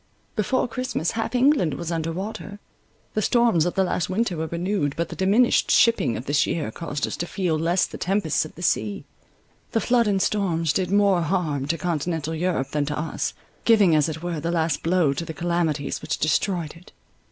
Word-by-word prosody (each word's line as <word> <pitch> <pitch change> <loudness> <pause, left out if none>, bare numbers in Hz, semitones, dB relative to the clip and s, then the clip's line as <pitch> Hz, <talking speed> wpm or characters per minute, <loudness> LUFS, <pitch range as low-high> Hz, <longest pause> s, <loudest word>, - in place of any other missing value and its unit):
Before 230 +5 +1
Christmas 250 -7 -2
half 225 +2 -3
England 250 - +3
was 165 +4 -5
under 165 -1 -2
water. 200 +3 -6 0.6
The 215 - 0
storms 225 -8 +3
of 175 - -3
the 190 - +3
last 180 -1 -1
winter 195 -1 0
were 160 0 -3
renewed; 170 -3 -1
but 170 0 -1
the - - -7
diminished 205 +6 +3
shipping 230 - +3
of 120 - -7
this 145 0 +2
year 150 -10 -2
caused 145 +1 -3
us - - -4
to 175 - -3
feel 180 -4 -1
less 170 +4 +2
the - - -9
tempests 195 -5 +1
of 155 - -10
the 175 - -8
sea. 105 - 0 0.7
The 225 - +3
flood 240 -1 +2
and 200 -2 +2
storms 170 -7 0
did 180 +3 0
more 200 -2 +3
harm 155 -5 -1
to 165 +2 0
continental 165 -2 -2
Europe 160 -5 -1
than 145 -1 -1
to 150 - -2
us—giving, 190 +4 +1
as 150 +1 +3
it 160 +1 -6
were, 175 -3 -2
the 165 +3 -3
last 165 -1 0
blow 165 -4 +2
to 155 - -4
the 160 -1 -7
calamities 170 -4 -1
which - - -2
destroyed 165 +1 0
it. 170 +2 -17
170 Hz, 200 wpm, -24 LUFS, 155-200 Hz, 0.7 s, England